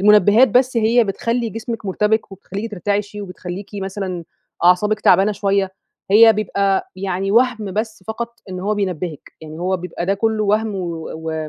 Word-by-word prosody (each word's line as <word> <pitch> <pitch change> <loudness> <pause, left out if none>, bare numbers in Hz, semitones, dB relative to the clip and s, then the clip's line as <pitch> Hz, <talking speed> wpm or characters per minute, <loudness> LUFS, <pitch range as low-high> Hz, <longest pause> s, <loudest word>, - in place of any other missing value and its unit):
المنبهات 210 +4 +6
بس 250 +3 +2
هي 230 +1 +4
بتخلّي 230 +4 -1
جسمِك 225 -1 -6
مرتبك، 210 +2 0
وبتخلّيكِ 200 +3 -6
ترتعشي، 205 +1 -2
وبتخلّيكِ 180 0 -7
مثلًا 190 -3 -4 0.4
أعصابِك 210 +5 +4
تعبانة 200 +2 +4
شوية. 195 -1 0 0.4
هي 225 +2 +8
بيبقى 200 -2 0
يعني 190 0 -2
وهْم 225 -4 +2
بس 215 -1 -3
فقط 235 +1 -5
إن 185 -1 -5
هو 210 +3 0
بينبّهِك. 180 -6 -4
إن 155 +1 -9
هو 185 +1 0
بيبقى 175 -1 -5
ده 195 - +2
كله 220 +1 0
وهم 210 +1 +1
و 170 -3 -4
و 160 -1 -4
200 Hz, 155 wpm, -19 LUFS, 185-220 Hz, 0.4 s, هي